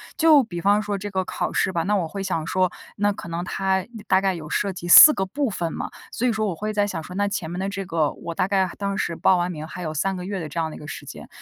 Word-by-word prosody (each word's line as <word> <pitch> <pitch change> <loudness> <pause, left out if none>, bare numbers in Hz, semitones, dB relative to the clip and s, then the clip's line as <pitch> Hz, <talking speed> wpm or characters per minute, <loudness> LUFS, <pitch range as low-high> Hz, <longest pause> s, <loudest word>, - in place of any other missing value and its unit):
就 315 -3 +6
比 175 -9 -6
方 205 +3 +3
说 205 -1 -3
这 205 +1 -6
个 190 -1 -1
考 - - -3
试 190 - 0
吧， 165 -2 0
那 205 - 0
我 175 -4 -1
会 195 +4 -5
想 165 -5 -2
说， 185 0 +1 0.2
那 205 +1 +1
可 200 - -8
能 170 +1 -3
它 190 0 -1 0.2
大 190 - +4
概 195 -1 +1
有 155 -3 -8
涉 200 +4 0
及 175 -2 -7
4 305 +12 +11
个 190 - -1
部 270 +7 -2
分 170 -5 -3
嘛， - - -4 0.2
所 245 - -1
以 245 - +3
说 215 0 -1
我 185 - -2
会 215 +6 -3
在 205 -1 +1
想 165 -5 -4
说， 180 - -10
那 205 0 +1
前 195 -5 -4
面 175 - -4
的 190 - -2
这 195 -1 -4
个， 160 -4 0
我 170 - -7
大 185 - 0
概 190 -2 +1
当 200 -1 -2
时 - - -1
报 190 - +4
完 175 0 0
名 155 -2 -7
还 180 - -8
有 155 -2 -4
3 190 +6 -1
个 180 - -6
月 195 +1 -4
的 165 - -5
这 150 - -9
样 165 -1 0
的 - - -9
一 - - -11
个 150 - -10
时 - - -7
间， - - -10
190 Hz, 320 characters per minute, -23 LUFS, 170-205 Hz, 0.2 s, 4